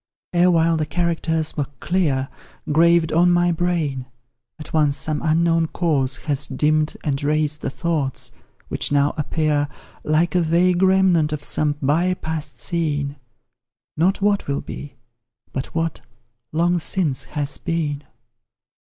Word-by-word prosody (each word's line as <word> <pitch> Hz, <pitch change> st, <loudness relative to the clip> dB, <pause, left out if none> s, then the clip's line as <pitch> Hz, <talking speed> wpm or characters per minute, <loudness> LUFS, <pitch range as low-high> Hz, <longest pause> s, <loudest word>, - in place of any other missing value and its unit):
Erewhile 170 Hz, -2 st, +4 dB
the 155 Hz, -, 0 dB
characters 165 Hz, -1 st, -1 dB
were 145 Hz, -3 st, -1 dB
clear, 150 Hz, -8 st, 0 dB, 0.4 s
Graved 170 Hz, +1 st, +4 dB
on 175 Hz, +2 st, +4 dB
my 175 Hz, 0 st, +3 dB
brain 160 Hz, -7 st, -1 dB, 0.5 s
at 155 Hz, -, -10 dB
once 150 Hz, -3 st, +3 dB
some 155 Hz, -1 st, -2 dB
unknown 165 Hz, +1 st, +2 dB
cause 145 Hz, -7 st, 0 dB
Has 140 Hz, -2 st, -1 dB
dimm'd 150 Hz, +3 st, +1 dB
and 140 Hz, -2 st, -1 dB
razed 150 Hz, 0 st, 0 dB
the -, -, -2 dB
thoughts, 150 Hz, -3 st, -2 dB, 0.4 s
which -, -, -1 dB
now 145 Hz, 0 st, +3 dB
appear, 150 Hz, -1 st, 0 dB, 0.4 s
Like 155 Hz, +3 st, +1 dB
a 180 Hz, -, +3 dB
vague 175 Hz, +2 st, +2 dB
remnant 190 Hz, -5 st, +4 dB
of 150 Hz, -1 st, -4 dB
some 150 Hz, -1 st, +1 dB
by 170 Hz, +7 st, +2 dB
past 155 Hz, -3 st, -5 dB
scene; 145 Hz, -4 st, -2 dB, 0.8 s
Not 190 Hz, +5 st, +1 dB
what 205 Hz, -1 st, +2 dB
will 140 Hz, 0 st, -1 dB
be, 145 Hz, -3 st, -8 dB, 0.6 s
but 130 Hz, -, -3 dB
what, 165 Hz, -1 st, -1 dB, 0.5 s
long 175 Hz, +2 st, +2 dB
since, 160 Hz, -6 st, 0 dB
has 145 Hz, -2 st, -3 dB
been. 155 Hz, -4 st, -2 dB
160 Hz, 135 wpm, -21 LUFS, 145-170 Hz, 0.8 s, Erewhile